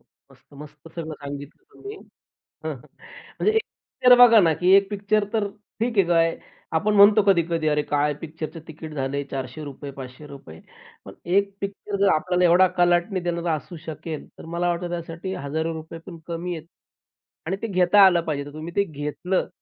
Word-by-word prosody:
मस्त, -, -, -27 dB
मस्त 150 Hz, +2 st, -12 dB
सगळं 160 Hz, -2 st, -5 dB
सांगितलं 145 Hz, -, -9 dB
तुम्ही 410 Hz, +1 st, -9 dB, 0.5 s
हं, -, -, -7 dB
हं. -, -, -9 dB, 0.6 s
म्हणजे 430 Hz, -, +3 dB
एक 445 Hz, -, +4 dB
पिक्चर 250 Hz, 0 st, +3 dB
बघा 240 Hz, -2 st, +8 dB
ना, 165 Hz, -5 st, +4 dB
की 180 Hz, +4 st, +2 dB
एक 195 Hz, 0 st, +4 dB
पिक्चर 205 Hz, +1 st, 0 dB
तर 210 Hz, -2 st, +1 dB, 0.3 s
ठीक 230 Hz, -1 st, -1 dB
आहे 195 Hz, -, +5 dB
काय 165 Hz, -1 st, +2 dB, 0.4 s
आपण 210 Hz, +6 st, +1 dB
म्हणतो 205 Hz, +1 st, +7 dB
कधी-कधी 170 Hz, -4 st, +2 dB
अरे! 150 Hz, -1 st, +2 dB
काय 145 Hz, 0 st, 0 dB
पिक्चरचं 160 Hz, +1 st, -7 dB
तिकीट 160 Hz, 0 st, -9 dB
झाले 140 Hz, 0 st, -2 dB
₹400 140 Hz, +2 st, -6 dB
₹500 135 Hz, -, -11 dB, 0.5 s
पण -, -, -10 dB
एक 200 Hz, +3 st, +2 dB
पिक्चर 200 Hz, +1 st, -5 dB
जर 200 Hz, -, +4 dB
आपल्याला 180 Hz, +3 st, +1 dB
एवढा 180 Hz, +2 st, +6 dB
कलाटणी 175 Hz, +2 st, +2 dB
देणारा 170 Hz, -1 st, -1 dB
असू 155 Hz, +3 st, -6 dB
शकेल, 160 Hz, -1 st, -6 dB
तर -, -, -11 dB
मला 170 Hz, +2 st, -2 dB
वाटतं, 175 Hz, +1 st, -2 dB
की -, -, -9 dB
त्यासाठी 170 Hz, +2 st, -5 dB
हजारो 160 Hz, +3 st, -3 dB
रुपये 160 Hz, +1 st, -8 dB
पण 175 Hz, -3 st, -9 dB
कमी 170 Hz, +1 st, -4 dB
आहेत. 160 Hz, -, -12 dB, 0.8 s
आणि 190 Hz, -, 0 dB
ते 230 Hz, -, -2 dB
घेता 185 Hz, 0 st, +4 dB
आलं 175 Hz, -3 st, +4 dB
पाहिजे, 145 Hz, -3 st, -2 dB
तर 145 Hz, -, -11 dB
तुम्ही 160 Hz, +3 st, -7 dB
ते 200 Hz, -, +3 dB
घेतलं 155 Hz, +3 st, -3 dB
170 Hz, 175 wpm, -24 LUFS, 150-190 Hz, 0.8 s, बघा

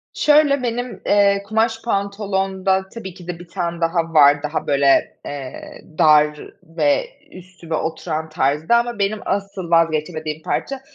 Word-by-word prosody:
Şöyle 295 Hz, -2 st, +3 dB
benim, 245 Hz, +1 st, -3 dB
eee, 200 Hz, -1 st, +3 dB
kumaş 225 Hz, +2 st, 0 dB
pantolonda 195 Hz, -2 st, -1 dB
tabii 190 Hz, -6 st, -8 dB
ki 180 Hz, -2 st, -14 dB
de 175 Hz, -1 st, -5 dB
1 175 Hz, -, -12 dB
tane 170 Hz, -1 st, -4 dB
daha 165 Hz, 0 st, 0 dB
var, 145 Hz, -1 st, +5 dB
daha 150 Hz, +2 st, -3 dB
böyle, 140 Hz, -1 st, +2 dB
eee, 140 Hz, -3 st, -8 dB, 0.2 s
dar 150 Hz, -1 st, +4 dB, 0.2 s
ve 165 Hz, -, 0 dB, 0.3 s
üstüme 180 Hz, -3 st, -8 dB
oturan 160 Hz, 0 st, -3 dB
tarzda 155 Hz, -, +1 dB
ama 235 Hz, -2 st, -2 dB
benim 200 Hz, +2 st, 0 dB
asıl 195 Hz, -3 st, -3 dB
vazgeçemediğim 155 Hz, -1 st, 0 dB
parça 275 Hz, -1 st, -3 dB
180 Hz, 135 wpm, -20 LUFS, 155-200 Hz, 0.3 s, var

